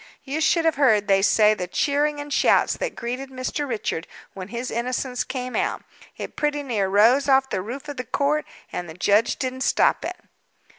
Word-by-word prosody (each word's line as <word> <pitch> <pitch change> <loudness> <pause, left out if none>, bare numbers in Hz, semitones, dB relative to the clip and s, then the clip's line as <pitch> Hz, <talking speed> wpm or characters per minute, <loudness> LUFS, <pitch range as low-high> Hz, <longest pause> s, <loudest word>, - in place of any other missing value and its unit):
You 295 +3 -3
should 330 +1 +3
have 320 -4 +2
heard, 220 -8 +3
they 195 -1 +4
say, 210 +1 +5
the 180 -4 -4
cheering 290 +8 0
and 290 0 -5
shouts - - +3
that - - -3
greeted 250 +3 -5
Mr. 265 +2 -4
Richard 210 -7 -3 0.3
when 185 -2 -7
his 235 +4 -5
innocence 250 +2 -2
came 255 -1 -5
out; - - -1 0.3
it - - -7
pretty 295 -1 -1
near 220 -8 -1
rose 235 +8 +4
off 265 0 +3
the 185 - -1
roof 245 +9 -7
of 290 -2 -6
the 255 - -3
court, 290 +4 0 0.3
and 175 -1 -4
the 160 - -9
judge 205 +4 +2
didn't 260 -1 -4
stop - - +2
it." - - -5
255 Hz, 195 wpm, -23 LUFS, 215-285 Hz, 0.3 s, say